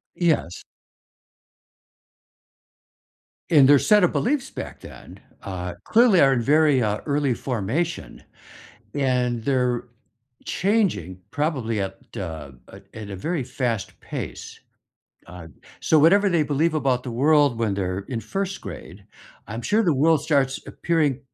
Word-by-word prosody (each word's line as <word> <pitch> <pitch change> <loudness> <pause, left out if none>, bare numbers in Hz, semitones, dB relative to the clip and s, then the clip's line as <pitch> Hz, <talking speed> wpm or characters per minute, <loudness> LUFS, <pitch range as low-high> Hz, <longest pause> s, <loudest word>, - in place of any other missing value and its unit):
Yes. 160 - 0 2.9
And 145 -5 +7
their 145 0 +7
set 210 +3 +4
of 175 - +2
beliefs 265 +2 -1
back - - -7
then, - - -12 0.2
uh, 90 -2 -5
clearly 225 -5 +5
are 135 -1 +5
in 120 - 0
very, 145 0 +3
uh, 105 0 -1
early 140 -3 +1
formation, 130 - -3 0.7
and 125 -4 0
they're 125 -3 0 0.6
changing 170 - 0
probably 130 -9 -1
at 95 0 -5 0.2
a 80 -8 -6 0.2
a 95 - -13
at 110 -2 -8
a 100 - -5
very 160 - -3
fast 120 -4 -3
pace. - - -7 0.7
Uh, 85 -1 -11 0.3
so, 160 - +3
whatever 200 +7 +5
they 170 -4 +2
believe 155 +3 0
about 130 -4 0
the 125 - -6
world 140 0 +3
when 110 -4 0
they're 95 -1 -2
in 120 -4 -3
1st 195 - -4
grade, - - -10 0.4
I'm 115 +2 -6
sure 215 +2 +2
the 165 - +2
world 155 +2 +3
starts 140 -3 +1
appearing 155 -6 0
135 Hz, 130 wpm, -23 LUFS, 110-160 Hz, 2.9 s, And